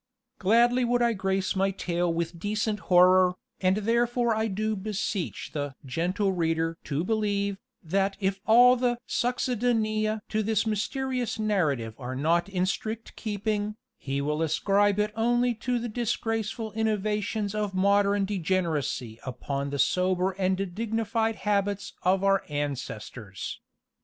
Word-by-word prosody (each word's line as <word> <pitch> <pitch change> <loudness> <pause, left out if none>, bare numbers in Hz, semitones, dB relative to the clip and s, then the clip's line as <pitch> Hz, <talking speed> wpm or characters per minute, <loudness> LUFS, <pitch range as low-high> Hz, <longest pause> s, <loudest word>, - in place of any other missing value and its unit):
Gladly 240 +5 +4
would 240 0 +2
I 235 -1 +3
grace 190 -1 -1
my 195 +1 +2
tale 175 -2 -1
with 170 0 -3
decent 210 +2 -1
horror, 180 0 +6 0.2
and 185 +1 +2
therefore 235 +2 +1
I 220 +1 0
do 215 +2 -1
beseech 200 -2 -3
the 145 -3 -3
"gentle 180 +9 0
reader" 165 -1 0
to 150 +2 -1
believe, 200 -1 0 0.2
that 195 +4 0
if 195 -1 -1
all 245 +3 +7
the 245 -1 +1
succedanea 225 -3 0
to 215 - 0
this 220 0 +1
mysterious 250 +3 -1
narrative 155 - 0
are 130 0 -5
not 170 +7 +1
in 185 -2 0
strict 220 +4 -4
keeping, 210 0 -2 0.2
he 140 0 -3
will 150 +2 -1
ascribe 200 +5 +2
it 210 0 0
only 240 +2 +2
to 245 +2 -2
the 240 0 -3
disgraceful 225 -1 -2
innovations 215 -1 -1
of 210 -2 -2
modern 200 +1 +3
degeneracy 165 - -1
upon 140 +2 -3
the 140 - -3
sober 180 +6 +2
and 190 0 -1
dignified 225 +1 -1
habits 205 -1 -1
of 190 +2 +2
our 195 -1 +3
ancestors. 125 -8 -5
200 Hz, 135 wpm, -27 LUFS, 180-220 Hz, 0.2 s, all